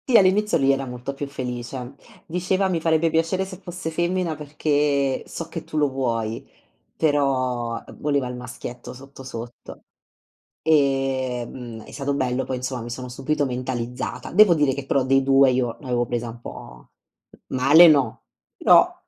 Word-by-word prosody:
Sì, 245 - +7
all'inizio 205 +1 +4
lui 135 -2 +3
era 135 0 0
molto 125 +2 -5
più 140 +1 -5
felice. 125 -1 -5 0.3
Diceva: 185 +2 0
"Mi 175 -3 -1
farebbe 160 0 +2
piacere 165 +4 +1
se 190 -1 -9
fosse 175 -3 -5
femmina, 175 0 -1
perché 145 -2 0
so 165 - -6
che 165 0 -6
tu 155 - -6
lo 145 -1 +3
vuoi". 115 -4 -2 0.5
Però 130 -6 0 0.2
voleva 145 -3 0
il 125 - -6
maschietto, 125 0 -8
sotto, 135 +1 -12
sotto. 120 -1 -9 0.8
Ehm, 130 -5 0
è - - -13
stato 140 0 -2
bello 130 -2 0
poi, 130 - -3
insomma, 125 0 -4
mi 120 - -7
sono 125 +2 -6
subito 135 +4 -1
mentalizzata. 125 -1 -4
Devo 210 -4 +7
dire 145 -4 +2
che, 140 0 -5
però 135 0 +1
dei 135 +1 +3
2, 135 0 +5
io 120 -2 -1
l'avevo 125 -3 -1
presa 120 0 -3
un 120 +1 -10
po' 60 - -11 0.6
male, 145 +7 +7
no. 145 -4 +2 0.3
Però, - - +5
135 Hz, 155 wpm, -23 LUFS, 125-155 Hz, 0.8 s, Sì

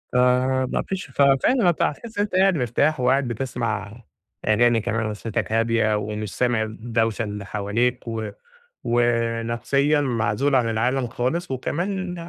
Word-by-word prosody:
آآ 125 +1 +3
ما - - 0
فيش 195 0 -3
ف 140 - -1
فعلًا 155 - +4
أنت 170 - -1
هتحسّ 225 +9 -2
إن - - +4
أنت 205 -3 -4
قاعد 190 0 +4
مرتاح، 135 +4 +1
وقاعد 130 +2 +2
بتسمع 115 -3 -3 0.5
أغاني 115 +2 +4
كمان 110 0 -1
ونفسيّتك 110 +1 -3
هادية، 115 -1 +2
ومش 105 0 -4
سامع 120 -3 +2
الدوشة 115 +1 -1
اللي 105 -1 -5
حواليك، 110 +5 -1
و 110 -2 -3 0.6
ونفسيًا 120 +4 +1
معزول 120 +1 0
عن 125 -3 +3
العالم 125 +4 0
خالص، 130 +9 -2
وكمان 180 +8 -2
120 Hz, 140 wpm, -23 LUFS, 110-135 Hz, 0.6 s, فعلًا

